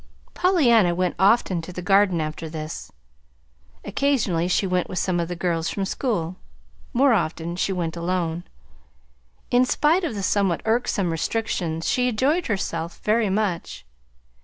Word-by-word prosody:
Pollyanna 235 - +4
went 180 -1 0
often 195 -3 +3
to 165 - -9
the 180 0 -7
Garden 195 -2 +3
after 155 +1 -5
this. 155 0 -7 0.9
Occasionally 215 -12 +1
she 185 +2 +1
went 180 -1 0
with 185 - -5
some 180 -1 0
of 170 - -1
the 175 - -4
girls 170 -2 -1
from 195 - -2
school. 185 -6 -2 0.5
More 265 0 +4
often 170 -3 -1
she 185 - -1
went 170 -3 -2
alone. 170 -1 -2 1.1
In 245 +1 +5
spite 305 +8 +2
of 300 -10 -2
the 200 - -4
somewhat 195 -3 +1
irksome 220 -5 +1
restrictions 165 -2 -2
she 250 0 +2
enjoyed 280 +10 +1
herself 170 -5 -3
very 215 0 +2
much. 195 -4 -2
185 Hz, 145 wpm, -23 LUFS, 170-225 Hz, 1.1 s, In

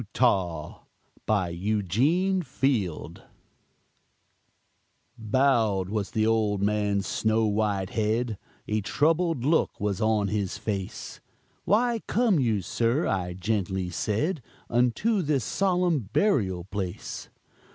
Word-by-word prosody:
UTAH 90 -11 +1 0.5
BY 100 -5 +1
EUGENE 110 - +1
FIELD 125 - -2 1.9
Bowed 110 -5 +1
was 105 -1 -2
the 110 -1 0
old 110 -2 +1
man's 105 -1 +1
snow 110 0 +1
white 100 -2 0
head, 110 0 -1 0.3
A 105 0 0
troubled 160 - +1
look 160 +2 +1
was 100 -2 -1
on 110 -2 +2
his 100 -3 -2
face, 100 -3 -5 0.4
"Why 230 +2 +2
come 225 -7 +2
you, 110 -7 +1
sir," 120 - 0
I 90 -2 -1
gently 95 -2 -2
said, 145 - -1 0.3
"Unto 125 - +2
this 145 -6 0
solemn 175 - 0
burial 100 - +1
place?" 95 -1 -5
110 Hz, 105 wpm, -27 LUFS, 100-140 Hz, 1.9 s, on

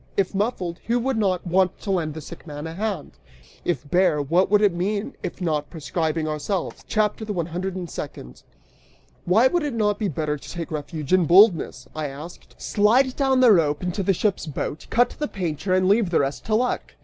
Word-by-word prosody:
If 195 -1 +1
muffled, 190 -4 -2
who 235 +1 +2
would 260 0 -1
not 190 -4 0
want 185 +1 +1
to 200 - -3
lend 160 -5 -1
the 160 - -6
sick 170 +3 -11
man 150 0 -6
a 160 - -5
hand? 195 -3 -4 0.4
If 170 -4 -2
bare, 175 -1 +3
what 165 +7 +2
would 210 +1 +4
it 200 -4 +4
mean 200 +4 -2
if - - -5
not 155 -5 -1
proscribing 160 -1 -2
ourselves?" 155 +5 -3
CHAPTER 215 0 0
THE 215 -1 -3
ONE 170 -4 -1
HUNDRED 180 +3 -4
AND 180 -2 -4
SECOND. 65 - -8 0.8
"Why 210 +8 +4
would 345 +6 +3
it 290 -5 -3
not 210 -2 +1
be 215 - 0
better 150 -2 -2
to - - -12
take 170 -2 -6
refuge 155 +1 -4
in 185 -2 +5
boldness," 170 - +4
I 155 -1 -2
asked, 150 +5 -10
"slide 245 +6 +3
down 265 -2 +2
a 245 - +8
rope 155 -5 +3
into 180 +3 -2
the 195 - +2
ship's 195 -2 -1
boat, 150 +1 -4
cut 245 +1 +3
the 300 - -1
painter, 180 - -3
and 185 0 +3
leave 205 -1 +3
the 170 - +3
rest 140 +1 -3
to 215 - +1
luck'? 250 +3 -1
185 Hz, 210 wpm, -23 LUFS, 160-210 Hz, 0.8 s, a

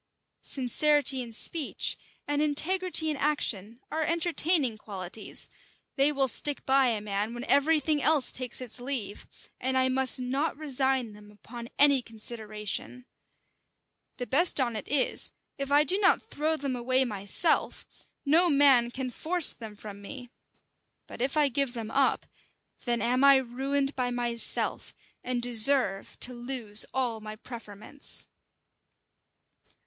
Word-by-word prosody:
Sincerity 275 +1 +2
in 235 -2 -8
speech, 295 +6 -2 0.3
and 290 0 -1
integrity 315 +2 +2
in 295 - -4
action, 235 -6 -3
are 320 - -2
entertaining 330 -5 +2
qualities: 200 -1 -3 0.5
they 280 +1 +3
will 275 -2 +1
stick 290 +3 +1
by 270 0 +3
a 225 -3 -1
man 210 +2 -4
when 240 - -6
every 290 +3 +2
thing 300 0 -1
else 300 -3 +2
takes 255 -1 -2
its 245 -1 -3
leave; 245 -6 -4 0.3
and 260 +1 -1
I 260 0 +2
must 260 0 +5
not 270 +6 -2
resign 265 -5 0
them 210 0 -16
upon 235 +3 -11
any 280 -2 +5
consideration. 220 +1 -4 1.1
The 245 - -4
best 315 +6 +2
on 240 -3 -1
it 215 - -6
is, 280 -2 0 0.3
if 275 0 -4
I 290 +1 +5
do 370 +7 +1
not 395 - +1
throw 310 +2 -1
them 275 -3 -4
away 255 +2 +1
myself, 205 - +1 0.4
no 335 +5 +4
man 275 -5 +4
can 255 +1 -6
force 340 +6 +2
them 220 -3 -11
from 205 -1 -11
me: 245 +3 -10 0.7
but - - -11
if 265 +4 -1
I 295 -1 +3
give 275 -1 -2
them 225 -2 -7
up, 275 -1 +1 0.6
then 240 -1 -1
am 250 +3 0
I 280 0 +7
ruined 270 +3 -2
by 250 -2 -2
myself, 240 -1 0 0.3
and 245 -1 -3
deserve 240 -3 +2
to 250 - -1
lose 240 -4 -1
all 245 -4 -2
my 215 0 -8
preferments." 225 +3 -6
260 Hz, 145 wpm, -27 LUFS, 235-285 Hz, 1.1 s, I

